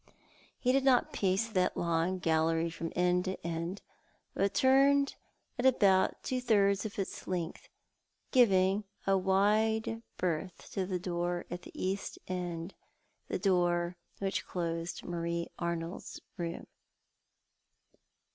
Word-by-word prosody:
He 250 - +2
did 270 +1 +3
not 260 -2 +3
pace 195 +3 +1
that 185 -5 0
long 170 +2 +1
gallery 165 -1 +1
from 165 0 -5
end 180 +1 +2
to 185 -2 -4
end, 170 +3 -3 0.5
but 200 0 0
turned 275 +1 +4 0.5
at 245 - 0
about 195 -7 +3
two 255 -1 -1
thirds 200 -3 +3
of 205 - -11
its 195 - -4
length, 175 -3 -4 0.6
giving 200 -5 +4 0.2
a 195 - +4
wide 215 +4 +2 0.2
berth 180 0 -3
to 190 -3 -2
the 185 -1 -1
door 175 0 -2
at 175 0 -4
the - - -12
east 190 +1 -3
end, 175 -1 -4 0.5
that - - -3
door 175 -2 +2 0.2
which 195 -1 -1
closed 170 -1 -3
Marie 170 -1 -3
Arnold's 170 0 -4 0.2
room. 170 -2 -4
185 Hz, 125 wpm, -32 LUFS, 170-200 Hz, 0.6 s, turned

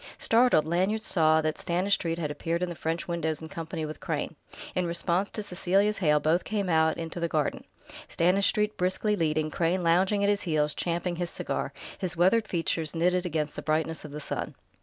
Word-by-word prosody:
Startled, 230 -9 +4
Lanyard 190 +7 0
saw 160 -4 +3
that 155 0 -2
Stanistreet 175 -1 0
had 155 -3 -2
appeared 170 +3 -2
in 180 - -1
the - - -4
French 165 +1 -3
windows 160 -3 -1
in 160 - -7
company 165 0 -5
with 155 0 -7
Crane. - - -3 0.4
In 180 -1 0
response 175 +3 0
to 215 - -4
Cecelia's 200 +2 +1
hail 150 -5 +3
both 160 +4 +2
came 205 -3 -2
out 160 -1 +3
into 165 +1 -5
the 170 - 0
garden, 155 -2 -1 0.4
Stanistreet 200 +4 +2
briskly 185 +4 +1
leading, 155 -3 0
Crane 175 +3 0
lounging 185 +5 +3
at 200 - +3
his 205 0 0
heels, 150 -4 +1
champing 175 0 -2
his 175 -1 -2
cigar, - - -3 0.3
his 180 -4 -3
weathered 210 +6 +3
features 165 -3 -1
knitted 180 +2 +1
against 155 -3 -2
the - - -5
brightness 160 +1 -1
of 155 - -8
the 150 +1 -6
sun. 150 - -4
170 Hz, 190 wpm, -28 LUFS, 160-185 Hz, 0.4 s, Startled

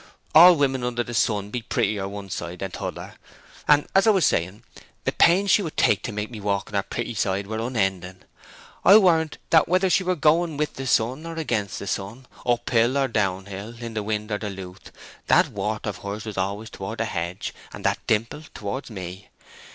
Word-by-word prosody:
All 175 +3 +9
women 135 -4 0
under 120 -1 -1
the 120 - -8
sun 105 -2 0
be 125 - -3
prettier 100 -3 -1
one 100 -1 -8
side 85 +1 -5
than 95 0 -5
t'other. - - -7 0.5
And, 150 0 +4
as 195 +3 +4
I - - +8
was 195 -5 +4
saying, 95 +7 0 0.4
the - - 0
pains 190 +4 +4
she - - +5
would 165 -5 -6
take - - +3
to - - -4
make 105 +2 -4
me 110 -3 -8
walk 100 -1 -1
on - - -16
the 100 - +2
pretty 120 +4 -4
side 95 -1 -1
were 110 +2 -4
unending! 95 -6 -2 0.6
I 200 - +9
warrant 165 -6 +3
that 160 -2 +5
whether 185 +2 +2
we - - -4
were 185 0 +1
going 160 +1 +2
with 150 0 -1
the 135 0 -6
sun 130 +8 +1
or 165 - -6
against 115 -11 -2
the - - -6
sun, 100 +6 -4 0.2
uphill 120 +1 +2
or 135 -1 +1
downhill, 100 +1 -3
in 115 -1 -7
wind 105 +1 -3
or 105 - 0
in 105 -2 -5
lewth, 95 -1 -10 0.4
that - - +4
wart 105 +2 -3
of 105 - -3
hers 100 +2 -6
was 110 -2 -6
always 100 +4 -3
towards 100 +4 -6
the 115 - -1
hedge, 85 -3 -4 0.2
and - - -9
that - - +1
dimple 115 +7 0
towards 105 +7 -5
me. 95 -2 -8
110 Hz, 205 wpm, -24 LUFS, 100-140 Hz, 0.6 s, All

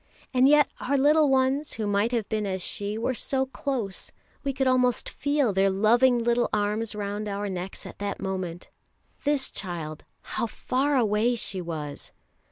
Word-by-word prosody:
And 255 +1 +5
yet 295 0 +6
our 280 +2 0
little 295 +2 +5
ones 270 +3 +2
who 220 - -3
might 205 +3 +1
have 230 -4 -1
been 215 -2 -1
as 190 -2 -2
she, 205 +1 -2
were 235 +3 0
so 265 +2 -1
close 260 -7 -3 0.3
we 280 - 0
could 265 0 -1
almost 250 -2 +2
feel 285 -5 0
their 195 +1 +3
loving 235 +6 +4
little 235 +1 +1
arms 210 +1 -1
round 205 +1 -3
our 200 0 -3
necks 185 0 -5
at - - -10
that 200 0 -3
moment 185 -3 -4 0.5
this 285 -2 +3
child, 165 -5 -5 0.2
how 235 - -2
far 270 +5 0
away 225 +1 +2
she 195 -4 -2
was! 155 -4 -6
225 Hz, 170 wpm, -26 LUFS, 200-260 Hz, 0.5 s, yet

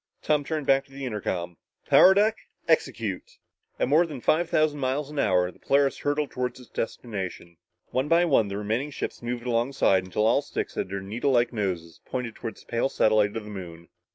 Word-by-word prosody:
Tom 150 -1 +2
turned 155 0 -3
back 135 0 +4
to 135 - -24
the 135 0 -6
intercom. 90 -7 -3 0.3
"Power 190 +1 +7
deck, 215 +2 +3 0.3
execute!" - - -1 0.4
At - - +1
more 160 +5 +4
than 145 -5 -7
five 160 +7 +2
thousand 155 -2 +2
miles 135 +2 -1
an 150 - -4
hour, 90 -5 +2
the - - -23
Polaris 140 0 +2
hurtled 145 0 -1
toward 125 -1 -3
its 125 -2 -14
destination. 95 -7 -5 0.3
One 130 +3 0
by 170 +2 +4
one 135 -10 +3
the 100 0 -4
remaining 110 +7 -1
ships 145 - -5
moved 120 0 -4
alongside 120 -5 +2
until 95 +4 -1
all 110 - +4
six - - -4
had - - -3
their 100 0 -4
needlelike 120 +5 +1
noses 90 -7 -3
pointed 125 -3 -4
toward 115 0 -7
the - - -17
pale 120 +3 0
satellite 110 -3 +2
of 110 - -5
the 105 - -9
Moon. 85 -4 -9
120 Hz, 195 wpm, -26 LUFS, 105-145 Hz, 0.4 s, Power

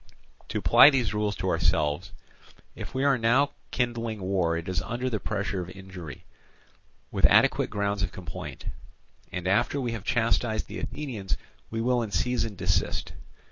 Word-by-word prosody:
"To - - -2
apply 140 - +8
these 125 -7 +1
rules 105 -1 0
to - - -2
ourselves, 75 -1 +1 0.6
if - - -8
we 130 - +1
are 140 -3 +3
now 130 +6 +3 0.2
kindling 115 -3 -1
war 95 -3 +1
it 85 - -6
is 90 -1 -1
under 125 +2 -3
the 110 - -1
pressure 100 -2 -2
of 90 - -6
injury, 95 -4 -9 0.9
with - - -3
adequate - - +5
grounds 100 0 -1
of 95 - -1
complaint; 85 -4 -8 0.7
and 90 0 -4
after 120 +8 +2
we 125 -3 -1
have 115 -4 -5
chastised 115 -1 +1
the - - -7
Athenians 115 -11 -4 0.3
we 115 0 -2
will 125 +1 +2
in 110 - -3
season 115 +3 0
desist. 90 -1 0
105 Hz, 160 wpm, -27 LUFS, 95-120 Hz, 0.9 s, apply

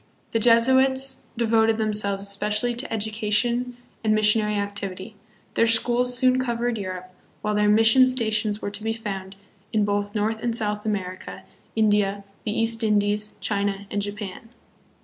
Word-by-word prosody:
The 225 - +1
Jesuits 260 +3 +3
devoted 225 -1 +2
themselves 210 -2 0
especially 210 +4 0
to 240 +4 -5
education 220 +3 -1 0.3
and 215 -1 +2
missionary 210 0 +3
activity. 200 0 -5 0.4
Their 230 - +3
schools 245 +2 +2
soon 255 0 +3
covered 240 -2 -1
Europe, 185 -1 -6 0.3
while 210 - 0
their 210 0 +2
mission 225 +4 +6
stations 215 -4 0
were 205 - -3
to 205 +1 -7
be 225 +1 -1
found 195 -4 -6 0.4
in 215 -2 +1
both 205 0 -2
North 215 +1 -1
and 235 0 -2
South 210 -2 -2
America, 185 -3 -4 0.3
India, 205 -2 +1 0.2
the 210 +1 -1
East 225 0 0
Indies, 210 0 0
China, 200 -1 -2
and 205 - -1
Japan. 205 +2 -6
215 Hz, 145 wpm, -24 LUFS, 205-230 Hz, 0.4 s, mission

